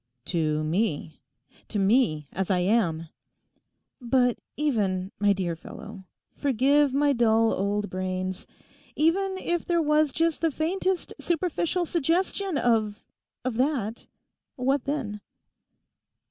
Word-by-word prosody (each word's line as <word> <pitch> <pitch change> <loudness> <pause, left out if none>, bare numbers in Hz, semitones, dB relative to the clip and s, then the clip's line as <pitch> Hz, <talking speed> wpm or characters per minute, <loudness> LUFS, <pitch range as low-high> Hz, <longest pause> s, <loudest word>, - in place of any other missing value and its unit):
'To 155 -3 0
me? 160 -1 -1 0.5
To 215 - -4
me, 195 - +2
as 190 -1 -2
I 190 - +3
am?' 180 -4 +1 0.9
'But 245 0 +2 0.2
even, 200 -10 0
my 205 0 +4
dear 185 -4 -1
fellow 190 +4 -10 0.3
(forgive 280 +2 +3
my 285 +1 +3
dull 225 -2 +3
old 205 +1 -1
brains!), 185 0 -3 0.5
even 380 +5 +2
if 345 -2 -1
there 345 -1 +1
was 300 -1 +3
just 330 +2 0
the 330 - +3
faintest 360 +5 -1
superficial 345 +1 0
suggestion 345 +3 0
of—of 225 +1 -2
that; 245 -5 -1 0.5
what 270 +1 0
then? 250 -8 -3
240 Hz, 110 wpm, -26 LUFS, 195-300 Hz, 0.9 s, my